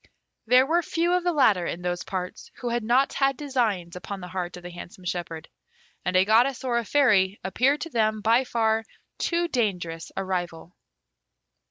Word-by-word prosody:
There 250 +2 +6
were 335 +5 +2
few 340 +2 0
of 360 -1 +1
the 355 - +2
latter 210 - +3
in 175 - -5
those 175 0 -2
parts 185 -1 -5
who 245 - -4
had 240 -1 -1
not 250 +5 +2
had 270 -1 +1
designs 225 - -1
upon 195 +2 -6
the 180 -1 -8
heart 180 -1 -4
of 175 - -12
the 175 - -8
handsome 175 +1 -11
shepherd, 170 -3 -4 0.6
and 180 - -1
a 185 +1 +5
goddess 240 +5 +3
or 240 -2 +1
a 235 - -5
fairy 205 -8 +3
appeared 255 +10 +1
to 330 - -5
them 215 -3 +1
by 230 +4 +4
far 225 -3 +1 0.4
too 345 0 0
dangerous 180 - -2
a 195 - -2
rival. 175 -2 -4
215 Hz, 185 wpm, -25 LUFS, 180-260 Hz, 0.6 s, There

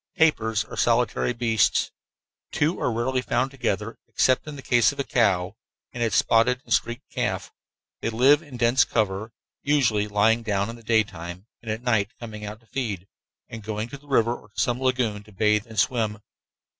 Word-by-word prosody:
Tapirs 115 - +2
are - - -9
solitary 120 +1 +2
beasts. 115 -2 +1 0.6
Two 155 +4 0
are - - +1
rarely 125 +3 0
found 130 +2 0
together, 115 -4 -3
except 130 +3 +2
in 150 - -6
the 135 - -10
case 120 -2 +4
of 140 - -12
a - - +1
cow 100 -6 +1 0.4
and 120 - -5
its 115 -4 +1
spotted 115 +4 +3
and 115 - 0
streaked 120 +4 -1
calf. - - -2 0.5
They - - -2
live 130 +6 +5
in 145 -6 -10
dense 120 +2 +4
cover, 110 0 -1 0.3
usually 120 -8 +2
lying 105 +3 +3
down 100 -1 -1
in - - -9
the 120 - -14
daytime 100 -5 -1 0.2
and 115 - -8
at 110 +2 -3
night 110 -3 +1
coming 110 -3 -8
out 105 +2 -7
to - - -26
feed, 105 -7 -4 0.4
and 115 - -8
going 110 +2 -4
to 140 - -8
the 145 - -22
river 120 -3 +2
or - - -15
to - - -9
some 120 +1 0
lagoon 125 -5 0
to 105 +1 -18
bathe 105 +2 +1
and 110 -1 -11
swim. 105 0 +1
115 Hz, 190 wpm, -25 LUFS, 105-125 Hz, 0.6 s, live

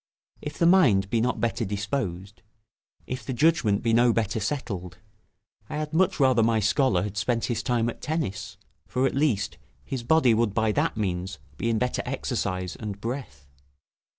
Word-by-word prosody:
If 150 - -6
the 170 - +2
mind 120 - +5
be 115 - +2
not 125 +2 0
better 115 0 0
disposed, 100 -2 -3 0.6
if 125 -1 -5
the 130 - -4
judgment 125 -8 +2
be 115 -1 +2
no 120 +1 +5
better 110 -1 0
settled, 100 -7 -4 0.7
I 150 - -4
had 155 0 -4
much 180 +1 +2
rather 130 -4 +4
my 115 0 +3
scholar 105 -2 +2
had 105 0 -5
spent 115 +3 0
his 115 -4 -1
time 115 +1 +1
at 120 - -5
tennis, 140 - -3 0.3
for, 130 +1 0
at - - +1
least, 130 -9 0 0.3
his 130 -3 -4
body 130 -1 +4
would 110 -2 +1
by 110 -1 +2
that 105 - 0
means 95 -2 -2 0.2
be 115 - -2
in 115 - +1
better 125 +3 0
exercise 100 -8 -3
and 105 -2 -6
breath. 115 - -6
115 Hz, 175 wpm, -26 LUFS, 100-130 Hz, 0.7 s, mind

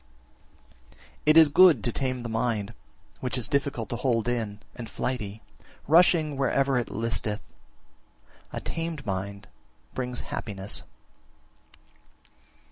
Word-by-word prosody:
35. - - -24 0.3
It 155 +1 +7
is 160 -2 +9
good 160 - +6
to 120 - +1
tame 130 0 -2
the 120 - -5
mind, 115 -2 -1 0.5
which 130 0 -2
is 125 - +1
difficult 140 -5 -1
to 120 - -2
hold 120 -3 +1
in 110 -4 -2 0.2
and 115 -2 -7
flighty, 110 -4 -4 0.4
rushing 160 -2 +5
wherever 135 -1 +2
it 120 - -3
listeth; 110 -1 -2 1.1
a - - -4
tamed 165 -3 -4
mind 100 +1 -4 0.5
brings 125 -1 -3
happiness. 100 -2 -5
120 Hz, 120 wpm, -27 LUFS, 110-140 Hz, 1.1 s, is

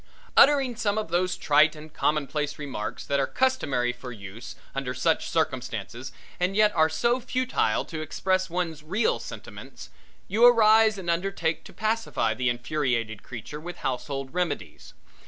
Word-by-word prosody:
Uttering 275 -4 +5
some 210 -3 0
of 215 -5 -2
those 180 +2 0
trite 150 +1 +4
and 155 0 -12
commonplace 150 0 -1
remarks 140 -8 -5
that 140 0 0
are 135 - +1
customary 145 - +1
for 125 0 -9
use 105 0 -9 0.2
under 135 -2 -3
such 160 +6 +1
circumstances 130 - -2 0.3
and 180 +2 0
yet 210 0 +4
are 160 -1 +4
so 235 +11 +1
futile 255 +1 0
to 160 -2 -6
express 185 +4 0
one's 165 -3 -2
real 190 +9 0
sentiments, - - -10 0.4
you 215 +5 +1
arise 220 -2 +6
and 185 -3 -7
undertake 170 -2 -1
to - - -11
pacify 225 +1 0
the 130 -1 0
infuriated 120 -4 -1
creature 130 +5 -8
with 175 +3 -8
household 135 +1 -3
remedies. 180 -4 -3
160 Hz, 150 wpm, -26 LUFS, 130-200 Hz, 0.4 s, arise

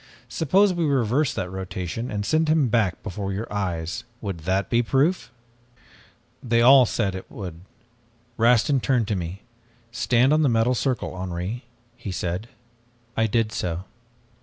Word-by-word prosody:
'Suppose 190 +5 +3
we 175 -1 -1
reverse 135 -1 +2
that 90 -1 -4
rotation 95 +4 -4
and 105 -1 -3
send 160 +4 +2
him 155 -5 +3
back 105 -6 +1
before 95 +2 -4
your 100 +4 -3
eyes 90 -4 -3 0.2
would 100 -5 -5
that 95 +5 0
be 120 0 +2
proof?' 140 +9 +1 1.1
"They 115 -2 +1
all 130 0 +8
said 100 -4 -1
that 95 - -4
it - - -14
would. 90 -5 -7 0.7
Rastin 120 +4 +3
turned 120 -5 +1
to 105 - +1
me. 90 +2 -5 0.5
'Stand 125 +2 +2
on 155 - +3
the 145 - +3
metal 115 +2 +2
circle, 125 -5 -2
Henri,' 95 +6 -4 0.3
he 115 -5 -6
said. 90 +5 -3 0.7
I 110 0 +2
did 110 0 +1
so. 85 -3 -3
115 Hz, 155 wpm, -24 LUFS, 95-130 Hz, 1.1 s, all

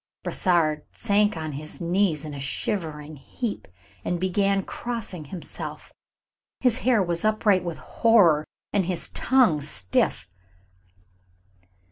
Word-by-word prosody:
Brossard 155 -4 +2
sank 205 -3 +2
on 155 -1 -4
his 150 +2 -8
knees 175 -3 +1
in 150 - -6
a 140 - -6
shivering 150 0 -3
heap, 215 - -5 0.4
and 175 - -1
began 195 +2 +1
crossing 225 -10 -4
himself. 170 +3 -7 0.7
His 250 -1 +2
hair 245 -5 +3
was 170 -1 0
upright 215 -3 +3
with 170 -2 -4
horror, 180 -10 +3 0.3
and 200 -3 +2
his 180 -1 -3
tongue 240 - +3
stiff. 95 - 0
180 Hz, 115 wpm, -25 LUFS, 155-210 Hz, 0.7 s, hair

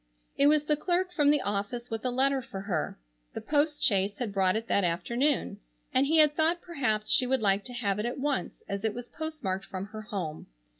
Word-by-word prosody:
It 280 - +4
was 300 0 +4
the 300 0 +2
clerk 360 +4 0
from 295 -5 +3
the 295 -1 +4
office 205 +4 -3
with 225 -1 -3
a 255 - 0
letter 265 +2 +1
for 195 -5 -7
her. 180 -6 -2 0.4
The - - -2
post 295 0 +1
chaise 200 0 +2
had 230 -5 -3
brought 190 -1 +3
it 225 +1 -2
that 200 - +2
afternoon, 205 - 0 0.3
and 265 +1 +3
he 320 +2 +3
had 300 -1 +5
thought 330 +2 +2
perhaps 245 -12 -1
she 250 - +5
would 260 -2 +1
like 200 0 +3
to 250 - -8
have 205 -5 -1
it 215 - -1
at 240 - -4
once 280 0 -2
as 200 +1 -4
it 220 -1 0
was 245 0 -6
postmarked 275 -13 -4
from 185 0 -5
her 215 +1 -8
home. 185 -8 -5
240 Hz, 220 wpm, -29 LUFS, 200-290 Hz, 0.4 s, had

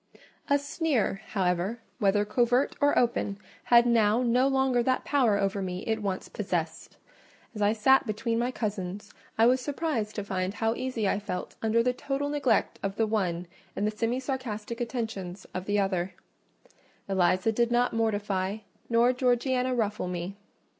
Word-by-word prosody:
A 285 - +5
sneer, 285 - -1
however, 185 +3 0 0.2
whether 205 -1 +3
covert 245 +5 +2
or 285 0 +3
open, 230 -4 +1 0.3
had 240 0 +6
now 230 0 +3
no 250 +2 +3
longer 265 -2 +2
that 255 +2 0
power 250 -8 +3
over 195 0 0
me 180 -1 -4
it 220 -1 -1
once 195 -2 -3
possessed: - - -4 0.6
as 210 - -6
I 205 +1 +4
sat 250 +4 +4
between 230 +2 -1
my 240 +1 +1
cousins, 205 -4 -4 0.2
I 225 - +5
was 255 +2 +4
surprised 270 -6 -2
to 205 - -3
find 190 0 -2
how 225 +1 +1
easy 245 -4 -2
I 195 - +1
felt 180 -3 -5
under 225 +1 +2
the 250 +1 +1
total 275 +3 -2
neglect 290 -3 +1
of 195 0 -3
the 225 - +2
one 180 -5 -1 0.3
and 205 - -1
the 215 0 -1
semi 230 +3 0
sarcastic 240 -4 -4
attentions 220 -6 -4
of 185 0 -4
the 205 +1 0
other—Eliza 185 0 -2
did 235 +2 +1
not 245 +1 +2
mortify, 205 -3 0 0.3
nor 235 +2 +4
Georgiana 250 0 +1
ruffle 210 -5 -1
me. 180 +2 -4
225 Hz, 160 wpm, -28 LUFS, 200-250 Hz, 0.6 s, had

